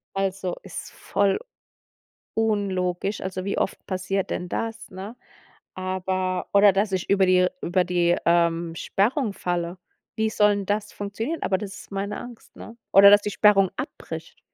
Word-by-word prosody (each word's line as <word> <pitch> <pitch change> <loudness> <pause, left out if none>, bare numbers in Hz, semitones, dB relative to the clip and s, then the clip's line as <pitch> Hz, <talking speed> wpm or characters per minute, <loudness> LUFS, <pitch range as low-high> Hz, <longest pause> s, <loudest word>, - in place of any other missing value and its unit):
Also, 190 -2 -1
ist - - -8
voll 200 - 0 1.0
unlogisch. 200 -3 0
Also 185 0 -4
wie 200 - -2
oft - - -2
passiert 190 +1 -2
denn 180 - -3
das, 225 -1 -4
ne? 195 +5 -8 0.6
Aber 185 0 -2
oder 200 0 +7
dass 200 +1 +1
ich 185 - -2
über 195 -1 +4
die 180 0 +4
über 180 +1 +1
die, 175 -1 +2
ähm, 170 -1 +2
Sperrung 220 - 0
falle. 175 0 -3 0.4
Wie 220 0 +1
soll 210 -1 +4
'n 200 -1 -3
das 205 +1 -2
funktionieren? 220 +10 -4
Aber 190 0 +1
das 195 -2 -6
ist - - -13
meine 200 +1 -3
Angst, 240 -2 -12
ne? 230 - -10 0.2
Oder 200 +1 +9
dass 205 0 +7
die 205 - -2
Sperrung 195 -2 +5
abbricht. - - -7
195 Hz, 155 wpm, -24 LUFS, 185-205 Hz, 1.0 s, Oder